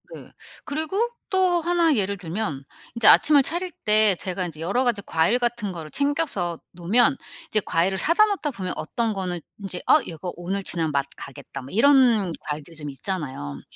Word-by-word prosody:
네. -, -, -13 dB, 0.3 s
그리고 315 Hz, +5 st, -3 dB, 0.3 s
또 370 Hz, -2 st, +2 dB
1 335 Hz, -3 st, +2 dB
예를 200 Hz, -1 st, -1 dB
들면 165 Hz, -6 st, -4 dB, 0.3 s
인제 230 Hz, -2 st, +3 dB
아침을 295 Hz, -2 st, +7 dB
차릴 350 Hz, +4 st, -2 dB
때 210 Hz, -2 st, +5 dB
제가 185 Hz, 0 st, -3 dB
인제 160 Hz, -3 st, -8 dB
여러 200 Hz, +10 st, 0 dB
가지 235 Hz, -5 st, 0 dB
과일 170 Hz, +10 st, +2 dB
같은 235 Hz, -5 st, -1 dB
거를 160 Hz, -3 st, -8 dB
챙겨서 280 Hz, -, -1 dB
놓으면 225 Hz, -, +3 dB, 0.3 s
이제 215 Hz, -, +1 dB
과일을 180 Hz, +4 st, +1 dB
사다 340 Hz, -, +4 dB
놓다 395 Hz, -8 st, -2 dB
보면 185 Hz, -6 st, -4 dB
어떤 225 Hz, +6 st, -2 dB
거는 180 Hz, -3 st, -3 dB, 0.2 s
인제 195 Hz, -3 st, -6 dB
'어 -, -, +6 dB
얘가 170 Hz, +2 st, -6 dB
오늘 185 Hz, +3 st, -3 dB
지나면 165 Hz, -4 st, -1 dB
맛 140 Hz, -1 st, 0 dB
가겠다.' 140 Hz, -, -9 dB
뭐 130 Hz, -, -11 dB
이런 230 Hz, -, +4 dB
과일들이 150 Hz, +2 st, -7 dB
좀 150 Hz, -2 st, -6 dB
있잖아요. 135 Hz, -, -5 dB
200 Hz, 340 characters per minute, -24 LUFS, 170-270 Hz, 0.3 s, 아침을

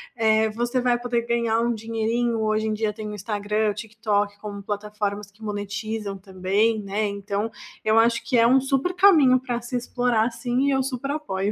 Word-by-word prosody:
eh, 220 Hz, -1 st, +3 dB
você 240 Hz, +3 st, -1 dB
vai 245 Hz, -1 st, +2 dB
poder 240 Hz, -1 st, -1 dB
ganhar 235 Hz, -1 st, +1 dB
um 235 Hz, 0 st, +1 dB
dinheirinho, 225 Hz, +1 st, -1 dB
hoje 215 Hz, 0 st, 0 dB
em 215 Hz, -, 0 dB
dia 215 Hz, 0 st, -1 dB
tem 215 Hz, 0 st, -6 dB
o -, -, -6 dB
Instagram, 210 Hz, +1 st, -1 dB
Tik 220 Hz, +1 st, -9 dB
Tok 205 Hz, -2 st, 0 dB
como 200 Hz, -1 st, -7 dB
plataformas 205 Hz, 0 st, -3 dB
que 210 Hz, +2 st, -18 dB
monetizam 205 Hz, 0 st, -4 dB
também, 195 Hz, +3 st, 0 dB
né, 205 Hz, +2 st, -1 dB
então 200 Hz, +2 st, -3 dB, 0.3 s
eu 220 Hz, +1 st, +4 dB
acho 235 Hz, +1 st, +3 dB
que 250 Hz, -, +1 dB
é 230 Hz, 0 st, +6 dB
um 260 Hz, +1 st, +5 dB
super 270 Hz, +6 st, 0 dB
caminho 320 Hz, -10 st, +6 dB
para 245 Hz, -2 st, -3 dB
se 240 Hz, +2 st, -6 dB
explorar 245 Hz, -1 st, +1 dB
sim 245 Hz, +3 st, -1 dB
e 280 Hz, -, +3 dB
eu 265 Hz, -, +2 dB
super 265 Hz, +1 st, -3 dB
apoio. 205 Hz, -10 st, -2 dB
220 Hz, 195 wpm, -24 LUFS, 210-240 Hz, 0.3 s, é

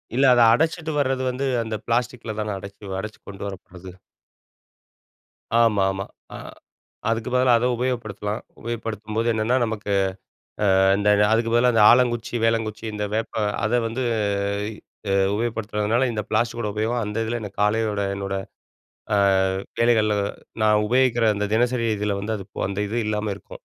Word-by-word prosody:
இல்லை. 135 Hz, +1 st, +4 dB
அதை 120 Hz, -1 st, +5 dB
அடைச்சிட்டு 160 Hz, +3 st, 0 dB
வர்றது 130 Hz, -1 st, 0 dB
வந்து, 130 Hz, +2 st, -2 dB, 0.2 s
அந்த 110 Hz, -1 st, -4 dB
பிளாஸ்டிக்ல 115 Hz, -2 st, -1 dB
தானே 105 Hz, -1 st, -2 dB
அடைச்சு 100 Hz, 0 st, -8 dB
அடச்சு 105 Hz, +2 st, -7 dB
கொண்டு 100 Hz, 0 st, -8 dB
வரப்படுது? 95 Hz, -1 st, -10 dB, 1.6 s
ஆமா, 115 Hz, -4 st, +4 dB
ஆமா. 95 Hz, 0 st, -4 dB, 0.3 s
அ -, -, -6 dB, 0.7 s
அதுக்கு 115 Hz, +2 st, -1 dB
பதிலா 125 Hz, 0 st, +4 dB
அதை 125 Hz, +2 st, +1 dB
உபயோகப்படுத்தலாம். 110 Hz, -4 st, -3 dB, 0.2 s
உபயோகப்படுத்தும்போது 115 Hz, -1 st, -3 dB
என்னன்னா 110 Hz, +3 st, +1 dB
நமக்கு, 105 Hz, -2 st, -4 dB, 0.9 s
அ -, -, +4 dB, 0.2 s
அந்த 105 Hz, 0 st, +2 dB, 0.2 s
அதுக்கு 115 Hz, 0 st, +1 dB
பதிலா 125 Hz, +1 st, +4 dB
இந்த 110 Hz, -, +5 dB
ஆலங்குச்சி, 120 Hz, -1 st, +2 dB
வேலங்குச்சி 115 Hz, -1 st, 0 dB
இந்த 105 Hz, 0 st, -3 dB
வேப்பம் 110 Hz, -1 st, -1 dB, 0.2 s
அதை 120 Hz, +3 st, +2 dB
வந்து, 115 Hz, +3 st, -3 dB, 1.1 s
அ -, -, +3 dB, 0.2 s
உபயோகப்படுத்துறதுனால, 110 Hz, +1 st, 0 dB
இந்த 105 Hz, -, -2 dB
பிளாஸ்டிக்கோட 115 Hz, 0 st, 0 dB
உபயோகம் 115 Hz, +2 st, 0 dB
அந்த 105 Hz, +2 st, -2 dB
இதில 120 Hz, +1 st, -2 dB
எனக்கு 105 Hz, -1 st, -7 dB
காலையோட, 105 Hz, 0 st, +1 dB, 0.2 s
என்னோட, 100 Hz, 0 st, -3 dB, 0.8 s
அ -, -, +3 dB, 0.6 s
வேலைகள்ல, 110 Hz, -3 st, +3 dB, 0.5 s
நான் 105 Hz, 0 st, +4 dB
உபயோகிக்கிற 120 Hz, -1 st, +3 dB
அந்த 105 Hz, 0 st, -1 dB
தினசரி 120 Hz, 0 st, +1 dB
இதில 105 Hz, -1 st, -1 dB
வந்து 110 Hz, +1 st, -2 dB
அது 95 Hz, -, -8 dB, 0.2 s
அந்த 100 Hz, +1 st, -4 dB
இது 120 Hz, +3 st, -1 dB
இல்லாம 105 Hz, -1 st, -1 dB
இருக்கும். -, -, -13 dB
110 Hz, 140 wpm, -23 LUFS, 105-120 Hz, 1.6 s, அதை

